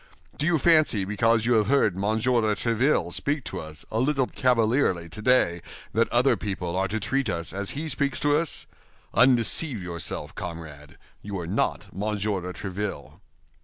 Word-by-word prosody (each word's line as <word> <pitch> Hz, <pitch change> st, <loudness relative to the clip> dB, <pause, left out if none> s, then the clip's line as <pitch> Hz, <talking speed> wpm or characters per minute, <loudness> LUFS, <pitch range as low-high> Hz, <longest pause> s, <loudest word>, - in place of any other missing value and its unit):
Do 150 Hz, -, -1 dB
you 175 Hz, -1 st, +3 dB
fancy 155 Hz, -, +4 dB
because 110 Hz, +2 st, +2 dB
you 120 Hz, -, +3 dB
have 110 Hz, -3 st, +3 dB
heard 115 Hz, -8 st, +3 dB
Monsieur 110 Hz, +5 st, +1 dB
de 105 Hz, -1 st, +1 dB
Tréville 120 Hz, +7 st, +1 dB
speak 145 Hz, -1 st, -1 dB
to -, -, -5 dB
us 80 Hz, 0 st, -9 dB
a 110 Hz, -, -1 dB
little 135 Hz, +1 st, +2 dB
cavalierly 115 Hz, -8 st, +1 dB
today 90 Hz, -2 st, +2 dB, 0.3 s
that 115 Hz, +2 st, +2 dB
other 125 Hz, +3 st, +3 dB
people 95 Hz, -4 st, -4 dB
are 95 Hz, +1 st, +1 dB
to 110 Hz, +2 st, -2 dB
treat 130 Hz, +7 st, -1 dB
us 85 Hz, 0 st, -3 dB
as 100 Hz, +6 st, -3 dB
he 160 Hz, -, -3 dB
speaks 140 Hz, -2 st, -1 dB
to 145 Hz, 0 st, +3 dB
us? 160 Hz, 0 st, -1 dB, 0.5 s
Undeceive 125 Hz, +2 st, +3 dB
yourself, 85 Hz, -3 st, -5 dB
comrade, 80 Hz, -5 st, -8 dB, 0.2 s
you 100 Hz, -1 st, -5 dB
are 85 Hz, -, -5 dB
not 85 Hz, -, -1 dB
Monsieur 105 Hz, 0 st, -2 dB
de 90 Hz, +1 st, -5 dB
Tréville." 100 Hz, +3 st, -6 dB
110 Hz, 165 wpm, -25 LUFS, 95-130 Hz, 0.5 s, fancy